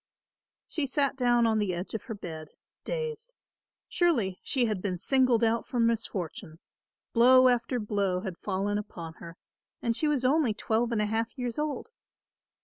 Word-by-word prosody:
She 300 -3 -2
sat 275 0 +1
down 240 -2 +3
on 220 -1 +2
the 195 -4 0
edge 175 +3 -6
of 220 - -4
her 225 - -5
bed, 160 -5 -7 0.4
dazed. 475 0 -4 0.5
Surely 235 - +1
she 255 -3 +1
had 210 -5 -2
been 185 -2 -2
singled 255 +2 +3
out 230 +1 +2
for 245 - -4
misfortune; 200 -7 -1 0.6
blow 255 +2 +7
after 245 0 +1
blow 200 -4 0
had 190 -3 -6
fallen 205 +2 -1
upon 170 -6 -8
her, 170 +1 -10 0.4
and 230 -1 -1
she 310 - +1
was 285 -4 +1
only 265 -5 +3
twelve 230 +1 0
and 215 -2 +1
a - - +1
half 225 +4 -2
years 245 0 -3
old. 300 - -3
230 Hz, 165 wpm, -28 LUFS, 200-255 Hz, 0.6 s, blow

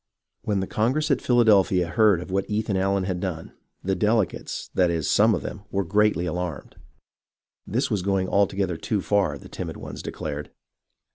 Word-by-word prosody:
When 100 -3 -1
the - - -1
Congress 135 +10 0
at 135 - +2
Philadelphia 100 -7 +4
heard 105 -1 +4
of 90 - -8
what 95 0 -1
Ethan 105 -1 -1
Allen 95 0 +1
had 90 -1 -2
done, 90 -4 -5 0.3
the 95 - 0
delegates, 105 0 -1
that 90 -2 +3
is, 80 -3 -1
some 110 +1 +4
of - - -5
them, - - -6
were 100 0 0
greatly 105 -1 +2
alarmed. 90 -3 -4 0.9
This - - -1
was 105 - +1
going 95 0 0
altogether 95 -3 +1
too 100 +4 -2
far, 95 -8 +1
the - - -13
timid - - -6
ones - - -8
declared. 75 -1 -5
95 Hz, 170 wpm, -25 LUFS, 90-105 Hz, 0.9 s, Philadelphia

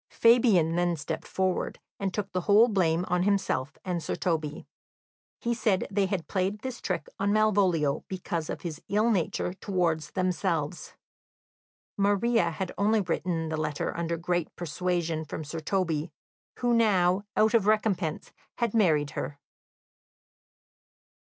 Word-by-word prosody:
Fabian 225 -9 +4
then 175 -1 +2
stepped 150 - -5
forward 185 -1 -1 0.2
and 195 -2 -1
took 205 0 -3
the 185 - -1
whole 210 +5 +6
blame 180 -4 +1
on 180 0 +1
himself 190 -8 0
and 180 -2 -1
Sir - - -3
Toby. 155 -4 -2 0.7
He 235 - 0
said 215 -4 +1
they 195 -1 +2
had 185 -4 -3
played 195 +2 -1
this 260 -1 -5
trick - - -2
on 200 +1 +1
Malvolio 190 -9 +2
because 175 -4 -4
of - - -4
his 165 -4 -6
ill 215 +3 +3
nature 185 -2 0
towards 175 -5 -1
themselves. 180 -3 -2 1.0
Maria 205 0 +2
had 180 +3 -4
only 215 +2 +3
written 170 -2 -2
the 160 - -2
letter 155 -1 -2
under 170 0 -2
great 175 0 -1
persuasion 175 -1 -2
from 155 +1 -6
Sir 155 +2 -5
Toby, 165 -2 -1 0.5
who 240 -1 +1
now, 190 -5 +3 0.2
out 220 +2 +4
of 220 -4 +3
recompense, 200 -7 0 0.2
had 235 -3 0
married 155 -10 +3
her. 145 - -5
185 Hz, 140 wpm, -28 LUFS, 165-205 Hz, 1.0 s, whole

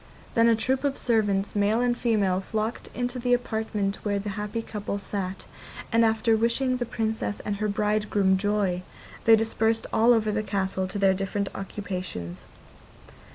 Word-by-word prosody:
Then 230 0 +5
a 230 - +5
troop 260 +4 0
of 280 -1 0
servants, 205 -4 +1
male 205 +2 +2
and 245 0 +2
female, 210 -6 +1
flocked 215 +3 -3
into 245 +1 -2
the 245 0 +3
apartment 220 -4 -2
where 205 -1 0
the 200 +1 -3
happy 210 +3 -3
couple 205 -2 -4
sat, 195 -1 -4 0.5
and 230 0 +4
after 225 0 +3
wishing 245 +3 +1
the 245 -2 -3
Princess 220 -2 -2
and 205 -1 -3
her 215 +1 -1
bridegroom 210 -2 +1
joy, 200 -2 0 0.4
they 225 -1 +8
dispersed 225 0 +1
all 225 +2 +5
over 220 -2 +3
the 215 +1 0
castle 195 -2 -1
to 195 - -5
their 195 -1 +4
different 195 +1 -2
occupations. 180 - -6
210 Hz, 160 wpm, -26 LUFS, 195-225 Hz, 0.5 s, they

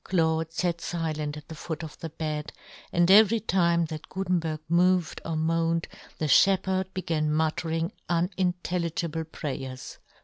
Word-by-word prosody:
Claude 160 -2 +1
fat 170 0 -1
filent 155 -4 -3
at 150 - -11
the - - -8
foot 160 +1 -5
of 155 - -7
the 165 - -5
bed, 155 -1 -4 0.4
and 175 +1 +4
every 220 +2 +7
time 170 -5 +2
that 155 -1 -7
Gutenberg 175 -5 -1
moved 175 0 +2
or 165 - -3
moaned 165 +1 +1 0.3
the 155 - -1
fhepherd 190 +3 +3
began 160 -5 0
muttering 160 +2 0 0.2
unin 180 +1 +1
telligible 165 -2 -2
prayers. 130 -3 -6
165 Hz, 140 wpm, -27 LUFS, 155-180 Hz, 0.4 s, every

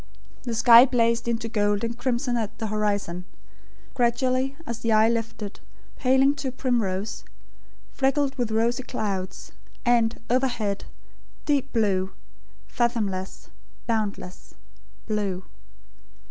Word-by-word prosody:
The 235 -2 -2
sky 235 +2 +8
blazed 230 -2 +1
into 230 -1 -1
gold 205 -2 +1
and 230 0 -2
crimson 245 0 -1
at 220 -3 -3
the 225 - -3
horizon; 205 -4 -1 0.7
gradually 255 +2 +1
as 235 -5 -5
the 230 - -1
eye 215 0 +5
lifted, 225 -3 -3 0.4
paling 265 +2 +4
to 275 -2 -3
primrose, 225 -6 -1 0.7
flecked 275 0 +1
with 245 -4 -1
rosy 230 +3 +1
clouds; 200 -7 -4 0.3
and, 235 -2 +3
overhead, 240 -5 0 0.6
deep 280 -2 +1
blue 195 -5 +1 0.5
fathomless, 210 -6 -2 0.4
boundless, 210 -5 -3 0.5
blue. 200 -4 -2
230 Hz, 105 wpm, -25 LUFS, 210-250 Hz, 0.7 s, sky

